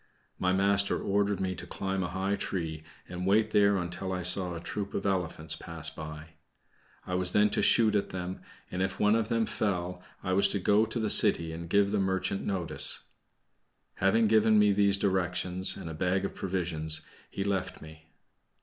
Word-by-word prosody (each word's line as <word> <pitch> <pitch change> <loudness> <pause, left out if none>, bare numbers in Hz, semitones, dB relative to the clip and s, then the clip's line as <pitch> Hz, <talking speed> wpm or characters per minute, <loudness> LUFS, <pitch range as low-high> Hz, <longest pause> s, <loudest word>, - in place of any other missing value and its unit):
My 90 - +1
master 100 +1 +2
ordered 100 0 0
me 95 -1 -1
to - - -9
climb 95 0 -3
a 90 - -1
high 95 +2 -1
tree, 80 -6 -4 0.2
and 90 +1 -5
wait 110 +2 +3
there 100 -1 +4
until 90 +1 -4
I 90 -1 -3
saw 90 0 -2
a - - -5
troop 100 +4 -5
of 100 - -3
elephants 80 -5 -2
pass 80 -1 -4
by. 75 0 -9 0.8
I 90 - -5
was 90 0 +1
then 105 0 +3
to - - +1
shoot 110 -2 +4
at 100 - 0
them, 90 0 -6 0.3
and 90 - -3
if 95 0 -2
one 105 0 +3
of 115 -1 -1
them 115 -1 +1
fell, 95 -5 -3 0.2
I 95 - -1
was 100 +1 +5
to 100 - 0
go 105 +4 +3
to 115 - -3
the 110 -2 +1
city 85 -6 +4
and 85 +1 -7
give 100 +1 +3
the 105 - 0
merchant 95 0 -1
notice. 90 -5 +3 1.0
Having 105 +4 +3
given 110 0 +4
me 105 -1 +5
these 100 0 +3
directions, 95 -1 0
and - - -8
a 80 - -6
bag 95 +4 0
of - - -4
provisions, 85 -5 -1 0.3
he 100 - -4
left 100 -2 -2
me. 80 0 -14
95 Hz, 190 wpm, -29 LUFS, 90-100 Hz, 1.0 s, was